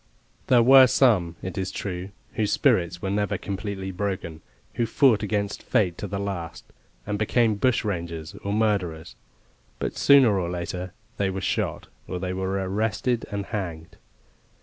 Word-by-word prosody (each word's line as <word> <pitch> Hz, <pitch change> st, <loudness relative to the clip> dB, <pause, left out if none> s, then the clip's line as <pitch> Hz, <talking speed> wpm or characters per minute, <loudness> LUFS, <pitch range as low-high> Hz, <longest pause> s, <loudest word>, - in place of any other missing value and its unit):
There 120 Hz, -2 st, +5 dB
were 130 Hz, +1 st, +8 dB
some, 100 Hz, -11 st, +3 dB
it 95 Hz, +2 st, -4 dB
is 95 Hz, 0 st, -2 dB
true, 95 Hz, -1 st, -5 dB, 0.2 s
whose 105 Hz, -2 st, 0 dB
spirits 85 Hz, -1 st, +2 dB
were 95 Hz, -, -1 dB
never 100 Hz, -1 st, 0 dB
completely 100 Hz, -1 st, -5 dB
broken 90 Hz, -4 st, -4 dB, 0.3 s
who 120 Hz, -, 0 dB
fought 120 Hz, -2 st, +4 dB
against 105 Hz, -1 st, -2 dB
fate 90 Hz, -5 st, +1 dB
to 105 Hz, -, -4 dB
the 100 Hz, +1 st, -4 dB
last, 95 Hz, -4 st, -5 dB, 0.4 s
and 105 Hz, 0 st, -3 dB
became 110 Hz, +1 st, +2 dB
bushrangers 90 Hz, -9 st, -1 dB
or 100 Hz, -, -2 dB
murderers; 100 Hz, -7 st, -1 dB, 0.6 s
but -, -, -3 dB
sooner 130 Hz, -8 st, +5 dB
or 85 Hz, -2 st, -2 dB
later 90 Hz, +1 st, -5 dB, 0.2 s
they 100 Hz, -1 st, +1 dB
were 95 Hz, 0 st, -3 dB
shot, 95 Hz, -, -2 dB, 0.2 s
or 90 Hz, -, -4 dB
they 90 Hz, 0 st, -3 dB
were 95 Hz, 0 st, -2 dB, 0.2 s
arrested 110 Hz, +4 st, -1 dB
and 100 Hz, -1 st, -3 dB
hanged. 85 Hz, -7 st, -5 dB
100 Hz, 150 wpm, -25 LUFS, 90-110 Hz, 0.6 s, were